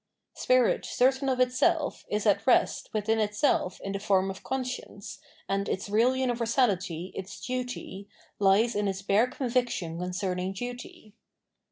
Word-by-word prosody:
Spirit 255 -2 +2
certain 265 +2 +1
of 255 -1 0
itself 285 +5 +1
is 210 +1 -1
at 205 +1 +2
rest 250 - +2
witbin 220 +1 0
itself 210 -3 0
in 195 - -4
tbe 195 - -4
form 195 -2 +2
of 190 - -10
conscience, 255 -6 -5 0.3
and 195 +1 -1
its 195 +2 -3
real 230 +5 +4
universabty, 230 -9 0
its 190 +1 -7
duty, 245 -6 -5 0.3
bes 205 +4 +4
in 205 0 0
its 195 0 -3
bare 205 +5 +3
conviction 240 - -2
con 180 0 -3
cerning 185 0 -2
duty. 245 -2 -8
215 Hz, 145 wpm, -28 LUFS, 195-250 Hz, 0.3 s, real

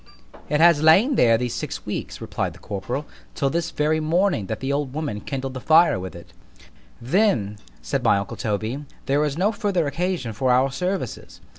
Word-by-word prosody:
It 150 - +1
has 170 -2 +6
lain 190 - +5
there 115 - +4
these 125 0 -2
six - - -5
weeks, - - -5
replied - - -3
the - - -15
corporal, - - -4 0.3
till 135 - 0
this 170 0 -1
very 155 0 0
morning 160 - +1
that 110 - -4
the 135 +1 -2
old 140 -2 -2
woman 145 -10 -3
kindled 135 -1 -4
the 130 - -6
fire 160 - +5
with 95 -1 -7
it— 85 - -13 0.7
——Then, 120 - +1 0.2
said - - -1
my - - +4
uncle 100 - -4
Toby, 110 +6 -3 0.2
there 145 +2 +2
is 150 -1 -2
no 195 +5 +2
further 200 -6 0
occasion 160 -4 -2
for 130 +4 -1
our 130 +2 +3
services. 180 +8 -4
145 Hz, 185 wpm, -23 LUFS, 120-170 Hz, 0.7 s, has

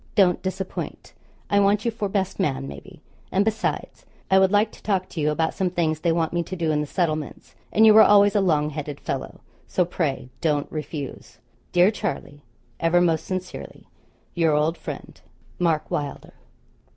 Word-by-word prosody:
Don't 185 -5 +4
disappoint. 190 0 -5 0.3
I 200 - +3
want 200 +2 +3
you 235 - +2
for 215 -3 -3
best 195 -1 -2
man, 140 - -1
maybe; 70 0 -11 0.3
and 195 +2 +2
besides, 220 0 -2 0.3
I 190 - +7
would 190 0 +4
like 210 +1 +3
to - - -16
talk 190 -3 0
to - - -6
you 150 - +2
about 160 +2 0
some 190 -1 0
things 160 -3 0
they 170 +1 +1
want 165 0 0
me 175 - +1
to 185 - -6
do 165 -3 0
in 150 -1 +1
the 150 - -3
settlements, 155 -3 -2 0.2
and 220 - +5
you 215 - +8
were 220 - +9
always 205 -1 +6
a 205 - +4
long 155 -5 +2
headed 145 -1 -5
fellow: 135 -1 -5 0.3
so 180 - +1
pray 150 -7 -2
don't 150 -3 +1
refuse. 150 -2 -6 0.3
'Dear 180 +3 +5
Charlie, 145 -7 -5 0.4
ever 165 +1 +3
most 165 -3 +2
sincerely, 185 -1 -6 0.5
'Your 165 -3 +2
old 155 +3 +2
Friend, - - -8 0.4
'MARK 165 -3 0
WYLDER. 145 -2 -4
175 Hz, 180 wpm, -24 LUFS, 150-195 Hz, 0.5 s, were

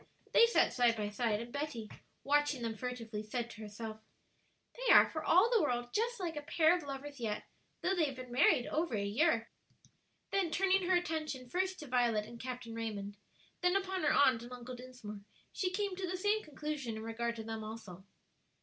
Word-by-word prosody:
They 465 - +7
sat 470 - +3
side 240 -2 +3
by 210 -1 -2
side, 210 0 0
and 235 +1 -9
Betty, 285 -7 -3 0.4
watching 290 -2 +2
them 225 -1 -2
furtively, 230 -2 -4
said 235 +2 -4
to 220 - -10
herself, 215 +1 -7 0.7
"They - - +1
are - - +9
for 315 - -5
all 375 +8 +5
the 460 -4 +5
world 245 -4 -1
just 470 +1 0
like 340 -4 -3
a 295 - -3
pair 320 +3 +4
of 360 - -3
lovers 280 -1 -7
yet, 215 -3 -2 0.4
though 375 - +1
they 345 -4 +3
have 275 -2 -4
been 255 -1 -9
married 250 -1 +4
over 315 -6 -1
a 200 -1 -1
year." 230 +2 +2 0.8
Then 390 -4 +1
turning 380 +1 +2
her 370 - +5
attention 315 -7 -2
first 370 +7 -1
to 300 - -8
Violet 240 -4 +2
and 235 +1 -11
Captain 250 -2 -6
Raymond, 210 -3 -4 0.5
then 360 +1 +3
upon 380 -1 0
her 295 - +3
Aunt 255 -5 +5
and 240 +1 -10
Uncle 250 0 -7
Dinsmore, 245 -5 -9 0.3
she 370 - 0
came 395 0 -2
to 375 0 -3
the 370 - -2
same 415 +3 +2
conclusion 300 - -4
in 220 - -6
regard 235 +1 -2
to 225 - -6
them 220 0 -5
also. 215 -4 -8
255 Hz, 200 wpm, -34 LUFS, 230-345 Hz, 0.8 s, are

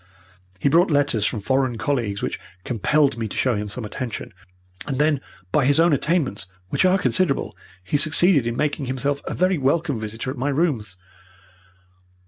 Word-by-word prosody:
He 95 - 0
brought 170 +6 +4
letters 145 -8 +2
from 110 - -3
foreign 130 +1 0
colleagues 115 -7 -2
which - - -3 0.2
compelled 135 +3 +1
me 110 - -2
to - - -7
show 125 -3 +2
him 105 0 -3
some 110 +3 -4
attention. 115 +1 -6 0.5
And 135 -3 -2
then, 150 -1 +2 0.3
by 140 +3 +2
his 140 +3 +3
own 165 -1 +4
attainments, 140 - 0 0.2
which - - +1
are 185 +1 +4
considerable, 185 -5 0 0.3
he 95 +10 0
succeeded 155 -2 +4
in 120 0 -2
making 150 -1 -1
himself 140 +2 -1
a - - -4
very 185 -2 +1
welcome 140 -1 0
visitor 110 +3 -5
at 135 - -8
my 135 +3 0
rooms. 135 - -1
135 Hz, 170 wpm, -22 LUFS, 115-150 Hz, 0.5 s, brought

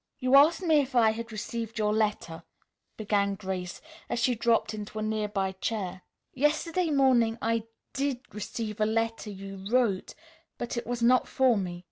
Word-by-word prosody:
"You 255 0 +2
asked 315 +6 +6
me 320 -3 +4
if 270 -2 -2
I 225 -2 +5
had 230 +1 -6
received 225 +1 -5
your 210 -1 +1
letter," 205 -7 -1 0.6
began 200 -2 0
Grace 185 -2 -5 0.3
as - - -1
she 245 +2 +2
dropped 230 -1 +1
into 210 0 -7
a 215 - -2
nearby 210 -3 -1
chair. 190 -1 -4 0.3
"Yesterday 315 +5 +1
morning 255 -6 +3
I 230 -1 0 0.3
did 275 -2 -1
receive 210 +1 -5
a 215 - +3
letter 225 0 -1
you 195 -1 -8
wrote, 230 -6 +1 0.4
but 240 - -4
it 235 - -4
was 240 -1 -2
not 250 +2 +4
for 260 -3 +3
me. 180 -3 -3
225 Hz, 165 wpm, -28 LUFS, 205-250 Hz, 0.6 s, asked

